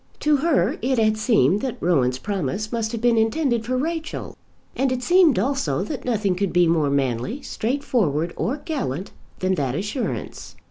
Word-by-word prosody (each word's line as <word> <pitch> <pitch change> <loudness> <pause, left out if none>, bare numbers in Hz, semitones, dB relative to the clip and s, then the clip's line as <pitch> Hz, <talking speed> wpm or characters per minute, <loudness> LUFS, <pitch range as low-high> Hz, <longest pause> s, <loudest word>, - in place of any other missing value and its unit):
To 300 -1 +3
her 315 +1 +1
it 260 +1 +1
had 215 -1 +3
seemed 210 - +2
that 260 -3 -3
Rowan's 130 -8 +2
promise 195 +3 -3
must 225 -2 -1
have 230 -2 -4
been 235 -1 +3
intended 235 0 +1
for 255 +1 0
Rachel, 320 +3 -4 0.4
and 265 0 +1
it 255 0 -2
seemed 350 -1 +5
also 270 +7 0
that 280 -4 -5
nothing 210 -6 +1
could 190 +1 -1
be 175 0 +4
more 160 -3 +2
manly, 140 - -1
straightforward, 215 - -1
or 265 +6 -1
gallant 200 - -3 0.3
than 185 0 +1
that 140 -7 -1
assurance. 210 - -4
220 Hz, 170 wpm, -23 LUFS, 175-265 Hz, 0.4 s, seemed